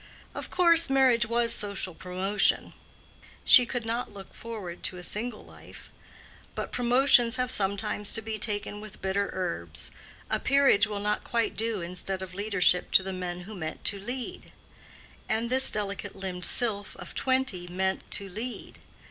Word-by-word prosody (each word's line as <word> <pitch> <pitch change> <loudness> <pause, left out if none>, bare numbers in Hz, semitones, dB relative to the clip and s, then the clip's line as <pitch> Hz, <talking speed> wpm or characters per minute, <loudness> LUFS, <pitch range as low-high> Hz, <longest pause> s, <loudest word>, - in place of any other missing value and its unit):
Of - - -6
course 335 -3 +5
marriage 255 -3 +4
was 235 0 +2
social 200 -3 -3
promotion; 185 +3 0 0.7
she 250 -2 +8
could 245 -2 -3
not 230 +2 -2
look 195 -1 -11
forward 210 -7 -7
to 180 - -1
a 180 - -8
single 215 +4 -4
life; - - -14 0.6
but - - -4
promotions 245 -1 +4
have 250 0 -1
sometimes 200 0 -1
to 225 - +1
be 220 0 -4
taken 205 -1 -2
with 215 -2 -11
bitter 195 +1 0
herbs—a 85 - -5
peerage 275 -7 +4
will 205 -1 -4
not 210 0 -1
quite 235 -1 -1
do 225 -3 0
instead 185 +2 -3
of 185 -1 -9
leadership 190 -3 +2
to 190 - +7
the 190 0 -4
man 180 -1 -4
who 205 +5 -9
meant 160 -4 -6
to 200 - +1
lead; 245 +5 -6 0.8
and 225 +2 -1
this 265 +1 +3
delicate 205 -1 -3
limbed 185 -2 -1
sylph 210 -5 0
of - - -10
twenty 260 -9 0
meant 190 +2 -1
to 200 - -1
lead. 225 +6 -7
205 Hz, 155 wpm, -28 LUFS, 190-235 Hz, 0.8 s, she